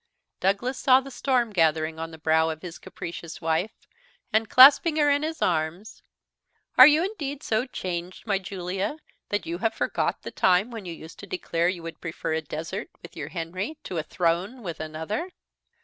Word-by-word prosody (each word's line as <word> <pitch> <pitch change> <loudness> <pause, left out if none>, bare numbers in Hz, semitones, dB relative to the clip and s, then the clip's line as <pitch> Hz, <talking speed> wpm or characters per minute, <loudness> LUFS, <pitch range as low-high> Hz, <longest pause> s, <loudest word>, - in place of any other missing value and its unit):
Douglas 205 +8 0
saw 260 -1 +6
the 275 +1 -9
storm 245 -2 +1
gathering 160 -2 +1
on 165 0 -4
the 160 - -11
brow 160 +1 +2
of 160 -1 -6
his 175 -2 -8
capricious 170 -1 -8
wife, 165 +6 -1 0.6
and 220 0 +2
clasping 285 +5 +8
her 295 -2 +4
in 285 0 +2
his 315 0 -2
arms, 170 +5 -2 0.7
"Are 255 - +11
you 305 +4 +4
indeed 300 -8 -5
so 225 +4 0
changed, 180 -5 -5
my 200 -3 +1
Julia, 190 - -4 0.3
that 205 -3 -1
you 170 +1 -4
have 225 +2 0
forgot - - -1
the - - -6
time 185 +5 +3
when 225 -4 -7
you 175 - -5
used 160 0 -12
to - - -9
declare 175 - 0
you 180 -2 -4
would 165 0 -8
prefer 160 -1 -3
a 160 - 0
desert 165 - -5
with - - -12
your - - -5
Henry 185 - -4
to 175 - -4
a - - -2
throne 180 +9 -1
with 170 -4 -5
another." 160 - -4
185 Hz, 185 wpm, -26 LUFS, 165-250 Hz, 0.7 s, Are